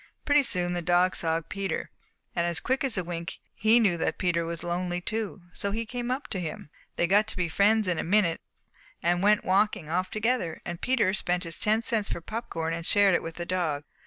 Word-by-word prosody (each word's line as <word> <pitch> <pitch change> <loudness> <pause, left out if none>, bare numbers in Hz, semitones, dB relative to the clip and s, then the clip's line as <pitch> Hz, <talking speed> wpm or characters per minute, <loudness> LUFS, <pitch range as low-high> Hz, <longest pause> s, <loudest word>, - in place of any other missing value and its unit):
Pretty 290 0 +5
soon 180 -8 +1
the 175 - -2
dog 180 +2 +3
saw 165 -1 +1
Peter, 195 -4 -3 0.4
and 170 -1 +1
quick 260 +2 0
as 260 -6 +1
a 185 - 0
wink 170 -1 -5 0.2
he 220 +3 +4
knew 195 -7 +3
that - - -1
Peter 170 -2 0
was 165 0 -5
lonely 175 0 -2
too, 210 -1 -4
so 200 - -2
he 225 +3 -2
came 245 +1 -4
up 260 +3 -2
to 190 - -3
him. 155 -3 -6 0.2
They - - +2
got 205 +4 +3
to - - -6
be 180 -1 0
friends 205 +5 +3
in 175 -3 0
a - - -1
minute 180 -2 +2 0.6
and 175 +1 +2
went 210 +1 +3
walking 190 -4 +1
off 185 +2 0
together, 215 -6 -1
and 175 -1 -5
Peter 235 -7 +2
spent 180 -2 0
his 165 -1 -4
ten 215 +2 +2
cents 220 -3 0
for - - -3
popcorn 165 -5 -4
and 165 0 -4
shared 200 +1 +4
it - - +2
with 165 0 -7
the 175 - -5
dog. 170 -5 -1
185 Hz, 220 wpm, -27 LUFS, 170-215 Hz, 0.6 s, Pretty